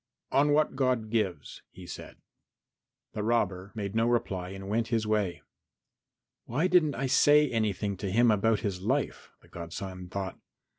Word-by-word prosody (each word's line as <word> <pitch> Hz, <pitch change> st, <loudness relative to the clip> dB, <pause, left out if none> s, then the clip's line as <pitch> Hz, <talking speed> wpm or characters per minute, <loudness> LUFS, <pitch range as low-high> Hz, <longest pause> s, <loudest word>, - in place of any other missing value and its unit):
"On 145 Hz, +2 st, +4 dB
what 150 Hz, -1 st, +2 dB
God 125 Hz, -5 st, 0 dB
gives," 95 Hz, -10 st, -2 dB
he 90 Hz, -, -12 dB
said. -, -, -9 dB, 1.0 s
The 105 Hz, -, -3 dB
robber 105 Hz, -4 st, 0 dB
made 100 Hz, -2 st, -4 dB
no 115 Hz, +1 st, +2 dB
reply 95 Hz, -7 st, -1 dB
and 95 Hz, 0 st, -8 dB
went 115 Hz, +3 st, 0 dB
his 115 Hz, -2 st, 0 dB
way. 105 Hz, -4 st, -1 dB, 1.0 s
"Why 145 Hz, +9 st, 0 dB
didn't 175 Hz, -5 st, +3 dB
I 135 Hz, -, -2 dB
say 145 Hz, +3 st, +5 dB
anything 105 Hz, -3 st, -1 dB
to 100 Hz, +1 st, -3 dB
him 115 Hz, +4 st, +4 dB
about 105 Hz, +1 st, +2 dB
his 95 Hz, -3 st, -3 dB
life?" 130 Hz, +8 st, -1 dB
the -, -, -19 dB
godson 90 Hz, +2 st, -7 dB
thought. 95 Hz, 0 st, -4 dB
110 Hz, 155 wpm, -29 LUFS, 95-120 Hz, 1.0 s, say